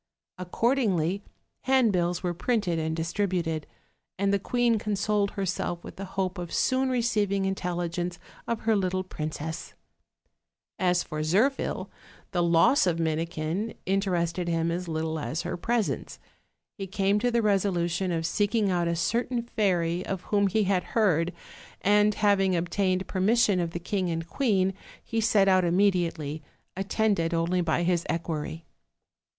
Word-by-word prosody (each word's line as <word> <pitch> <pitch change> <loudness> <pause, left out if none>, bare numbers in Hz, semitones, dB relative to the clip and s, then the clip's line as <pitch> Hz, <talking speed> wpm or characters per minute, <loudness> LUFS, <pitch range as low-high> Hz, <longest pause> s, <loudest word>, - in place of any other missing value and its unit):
Accordingly, 195 - +1 0.4
handbills 200 -10 +2
were 175 -1 0
printed 185 -3 0
and 160 0 -1
distributed, 165 -2 -1 0.5
and 200 +1 +1
the 200 - +2
queen 235 +2 +1
consoled 205 0 0
herself 180 -2 -2
with - - -10
the 195 - -5
hope 185 -1 -1
of 175 -1 -6
soon 260 0 +1
receiving 210 -6 +1
intelligence 175 -2 -2 0.3
of 230 -1 -2
her 220 -1 +2
little 185 -1 0
princess. 160 -2 -5 1.0
As 180 -1 +2
for 155 0 -5
Zirphil, 210 - +1 0.4
the 175 - +1
loss 170 +8 +4
of 170 -2 +1
Minikin 165 +5 -2
interested 180 -3 0
him 165 0 0
as 175 +1 -3
little 160 0 -2
as 155 +2 -3
her - - -3
presence. 230 +5 -1 0.6
He 195 - -4
came 195 +2 +1
to 245 - +1
the 235 -1 +1
resolution 190 -3 +1
of 165 -1 -1
seeking 205 +3 +1
out 175 -1 +1
a 170 - 0
certain 235 +7 0
fairy 180 -6 0
of 190 -2 -3
whom 200 -1 +2
he 215 +3 +1
had 190 -2 +1
heard, 180 -6 +3 0.5
and 210 +1 +4
having 195 -3 +3
obtained 185 +2 0
permission 205 0 +2
of 170 -1 0
the 170 - -5
king 185 +1 -1
and 165 0 -3
queen 195 -6 +1 0.3
he 225 -1 -1
set 210 -3 +4
out 185 -1 +5
immediately, 170 -5 +1 0.3
attended 195 -3 0
only 170 +2 +1
by 170 0 +1
his 175 -1 +1
equerry. 165 -1 -3
185 Hz, 145 wpm, -27 LUFS, 170-205 Hz, 1.0 s, out